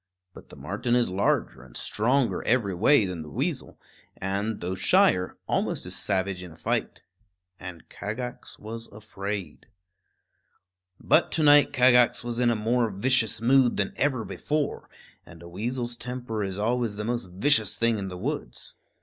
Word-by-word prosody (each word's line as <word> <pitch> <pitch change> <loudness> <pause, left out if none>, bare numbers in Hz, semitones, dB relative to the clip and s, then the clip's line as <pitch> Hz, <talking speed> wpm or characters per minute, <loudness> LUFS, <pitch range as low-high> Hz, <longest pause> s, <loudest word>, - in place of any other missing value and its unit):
But - - -14
the - - -12
marten 120 0 -2
is 120 -6 +2
larger 95 -8 0
and - - -12
stronger 125 +4 0
every 110 -5 +1
way 110 +6 +4
than 90 -3 -5
the 75 - -9
weasel, - - -3 0.4
and, 100 +3 -2
though 90 +2 -3
shyer, 90 0 +2
almost - - -1
as - - -3
savage 95 -2 -1
in 90 -2 -9
a 80 - -15
fight. - - -2 0.6
And 90 -3 -9
Kagax 120 +4 -6
was 115 +2 -8
afraid. 100 -4 -7 1.3
But - - +3
to 160 - +1
night 145 0 +6
Kagax 125 -1 +4
was 120 0 -3
in 125 -1 +3
a 120 - +2
more 115 +2 +1
vicious 110 +2 +1
mood 125 +1 +4
than 100 - -1
ever 130 -5 0
before; 150 -1 -3 0.3
and 85 0 -14
a - - -10
weasel's 120 +6 -3
temper 120 -3 -5
is 95 -1 -4
always 115 0 -1
the 105 +1 -4
most 120 -1 -2
vicious 110 +3 +3
thing 115 -2 +1
in 95 - -4
the 90 -1 -7
woods. - - -5
110 Hz, 160 wpm, -26 LUFS, 95-125 Hz, 1.3 s, night